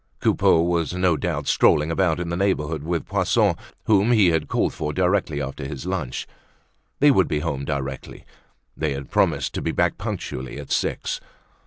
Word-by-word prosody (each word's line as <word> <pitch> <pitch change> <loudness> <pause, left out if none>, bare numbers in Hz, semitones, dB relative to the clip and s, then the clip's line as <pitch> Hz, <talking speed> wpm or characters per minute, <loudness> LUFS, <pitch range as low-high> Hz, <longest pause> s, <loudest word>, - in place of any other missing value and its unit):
Coupeau 80 - +3
was 85 0 0
no 90 -2 +2
doubt 75 -3 -2
strolling 75 +3 +3
about 85 -1 +1
in 85 -1 -3
the 85 - -2
neighborhood 80 -5 0
with 85 +2 -2
Poisson - - +2 0.3
whom 105 +2 +3
he 105 -6 +5
had 80 -2 0
called - - 0
for 75 -1 -3
directly 90 -4 +1
after 70 +1 -5
his 70 +1 -6
lunch; 90 -9 -3 0.7
they 145 0 +6
would 95 -9 +3
be 75 - -1
home 70 -3 -3
directly, 70 -2 -5 0.5
they 75 -2 -1
had 70 0 -7
promised - - +1
to - - -3
be - - -1
back - - 0
punctually 65 0 -5
at - - -9
six. - - -1
80 Hz, 175 wpm, -23 LUFS, 75-90 Hz, 0.7 s, they